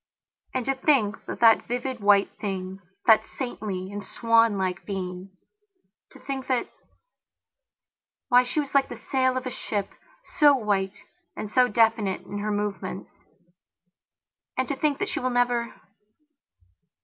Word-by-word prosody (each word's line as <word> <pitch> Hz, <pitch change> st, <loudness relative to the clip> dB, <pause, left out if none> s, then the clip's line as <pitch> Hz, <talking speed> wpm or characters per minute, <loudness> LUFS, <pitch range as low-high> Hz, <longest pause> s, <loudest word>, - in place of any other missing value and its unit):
And 255 Hz, -2 st, -1 dB
to 270 Hz, -, +1 dB
think 260 Hz, -7 st, +1 dB
that -, -, -6 dB
that 225 Hz, -1 st, +5 dB
vivid 245 Hz, +1 st, -3 dB
white 200 Hz, -1 st, +4 dB
thing, 190 Hz, -2 st, -4 dB, 0.3 s
that 220 Hz, -2 st, +6 dB
saintly 200 Hz, -7 st, -5 dB
and 205 Hz, 0 st, -6 dB
swanlike 205 Hz, -5 st, +1 dB
beingto 185 Hz, -1 st, -5 dB, 1.0 s
think 270 Hz, -1 st, -4 dB
that... 255 Hz, -2 st, -1 dB, 1.6 s
Why, 245 Hz, 0 st, +6 dB
she 250 Hz, +5 st, -2 dB
was 285 Hz, -2 st, -3 dB
like 275 Hz, -1 st, +3 dB
the -, -, -6 dB
sail 260 Hz, -1 st, 0 dB
of 255 Hz, -, -4 dB
a 255 Hz, -, -3 dB
ship, 205 Hz, -4 st, -3 dB, 0.5 s
so 290 Hz, -2 st, +7 dB
white 205 Hz, -5 st, -1 dB, 0.3 s
and 210 Hz, -, -5 dB
so 250 Hz, +1 st, +4 dB
definite 225 Hz, -5 st, +2 dB
in 205 Hz, -, -7 dB
her 210 Hz, +1 st, -2 dB
movements. 205 Hz, -2 st, -3 dB, 1.5 s
And 260 Hz, 0 st, 0 dB
to 280 Hz, -, -1 dB
think 290 Hz, 0 st, 0 dB
that -, -, -2 dB
she -, -, -2 dB
will 255 Hz, -, -1 dB
never... 245 Hz, -1 st, +1 dB
225 Hz, 135 wpm, -26 LUFS, 200-255 Hz, 1.6 s, so